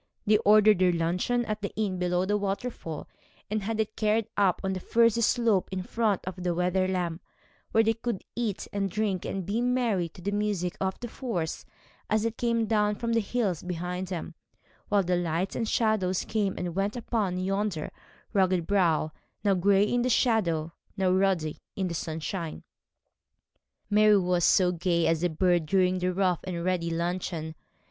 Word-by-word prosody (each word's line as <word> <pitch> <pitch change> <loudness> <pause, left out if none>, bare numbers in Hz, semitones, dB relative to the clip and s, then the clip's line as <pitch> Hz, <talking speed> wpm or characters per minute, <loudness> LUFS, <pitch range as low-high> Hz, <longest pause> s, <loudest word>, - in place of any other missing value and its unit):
They 215 0 +5
ordered 215 -2 +5
their 185 -1 +4
luncheon 180 +9 0
at 215 -1 -3
the 200 - -3
inn 200 -4 -1
below 180 0 +1
the 205 +2 +1
waterfall, 200 -5 -3 0.4
and 215 0 0
had 220 +2 -3
it 215 0 -1
carried 215 0 +1
up 195 -3 +2
on 190 0 0
to 185 - -3
the - - -16
furzy 230 0 +3
slope 225 -4 +2
in 185 -1 -3
front 215 -2 0
of 185 +1 -5
Wetherlam, 180 -1 0 0.5
where 225 - +4
they 225 0 +3
could 230 -2 -4
eat 225 -5 -2
and 200 -1 -1
drink 200 -2 -1
and 190 -2 -3
be 210 +5 -1
merry 240 -8 +1
to 165 - -16
the 200 - -1
music 205 -3 -1
of 190 0 -1
the 240 - -4
force 220 -10 -4 0.4
as 215 +1 +2
it 230 0 -3
came 235 -1 +1
down 210 -1 +2
from 230 +2 -2
the 230 - +3
hills 205 -6 -1
behind 180 +1 -4
them, 175 -1 -5 0.6
while 205 -1 +3
the 180 0 +1
lights 175 +2 -1
and 225 -2 -1
shadows 210 -5 +1
came 205 -3 -1
and 175 -1 -3
went 200 +3 0
upon 215 -6 -1
yonder 195 -3 -2 0.4
rugged 185 -4 +2
brow, 170 -6 +2 0.3
now 200 -2 +3
gray 195 +2 +4
in 240 +3 +1
the 250 - +1
shadow, 175 - +1 0.2
now 190 -1 +2
ruddy 185 -5 +1 0.2
in 190 -2 -1
the 170 - -4
sunshine. 160 +1 -4 1.2
Mary 210 0 +5
was 180 0 +3
as 180 -1 +3
gay 170 -1 +1
as 165 -1 +2
a 175 - +2
bird 175 0 +1
during 185 +1 +2
that 180 0 0
rough 180 -2 +1
and 175 -2 -4
ready 180 -2 0
luncheon. 170 -1 -3
190 Hz, 180 wpm, -28 LUFS, 180-215 Hz, 1.2 s, They